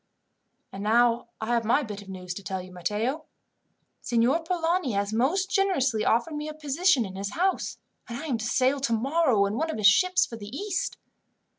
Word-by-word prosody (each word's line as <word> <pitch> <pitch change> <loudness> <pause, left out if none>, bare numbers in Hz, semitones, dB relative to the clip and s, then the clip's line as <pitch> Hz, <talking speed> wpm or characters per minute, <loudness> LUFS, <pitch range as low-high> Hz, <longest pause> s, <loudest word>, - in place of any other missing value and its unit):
"And 195 - -7
now 235 +3 +3
I 220 - -3
have 235 -1 +2
my 240 +7 +2
bit 205 -4 -7
of 200 - -14
news 180 -1 -6
to 200 - -9
tell 190 -1 -3
you, 185 0 -10
Matteo. 210 - -2 0.8
Signor 240 +7 +2
Polani 335 - 0
has 200 +1 -1
most 350 - +1
generously 275 - +1
offered 240 +10 +1
me 300 0 -4
a 305 - -7
position 300 -2 +2
in 190 -1 -8
his 195 +1 -4
house, 375 +3 0 0.3
and 235 - -4
I 315 - -6
am 255 -7 -1
to 220 - -4
sail 260 +4 +2
tomorrow 255 -1 +2
in 200 +3 -2
one 320 +3 -1
of 315 - -3
his 210 - -2
ships 365 - +5
for 230 - -9
the 205 -2 -9
East." 375 - -3
240 Hz, 195 wpm, -26 LUFS, 210-320 Hz, 0.8 s, ships